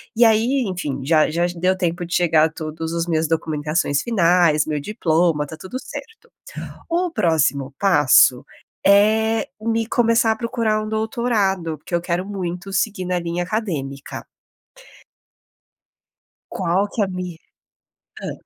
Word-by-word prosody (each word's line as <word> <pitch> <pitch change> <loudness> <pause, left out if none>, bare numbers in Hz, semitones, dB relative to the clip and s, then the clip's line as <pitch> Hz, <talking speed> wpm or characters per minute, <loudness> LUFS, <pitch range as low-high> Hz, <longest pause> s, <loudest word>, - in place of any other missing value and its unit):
E 235 +1 +5
aí, 230 +5 +3
enfim, 150 -7 -4
já 155 0 +3
já 170 +2 +1
deu 185 +2 +2
tempo 175 -1 -2
de 175 - -7
chegar 160 -3 +3
todos 160 +1 -5
os 170 0 -1
meus 160 -1 +1
documentações 155 -2 0
finais, 175 -8 +3
o - - -7
meu 150 - -1
diploma, 165 -4 +1
tá 160 - -8
tudo 190 +9 -7
certo. 450 +10 -10 0.6
O 350 +1 0
próximo 145 - +1
passo 145 -9 +5 0.4
é 220 +3 +3
me 225 0 -1
começar 230 -2 +3
a 220 - -3
procurar 230 -2 -1
um 215 - -5
doutorado 215 -7 -1
porque 175 - -8
eu 170 - +2
quero 175 +1 -2
muito 190 -1 -5
seguir 190 0 -1
na 180 0 0
linha 170 +1 -3
acadêmica. 155 -11 -4 2.3
Qual 185 +2 0
que 225 - -2
é - - +3
a - - -6
min 180 -2 -5 0.8
hã. - - -5
180 Hz, 145 wpm, -21 LUFS, 160-215 Hz, 2.3 s, E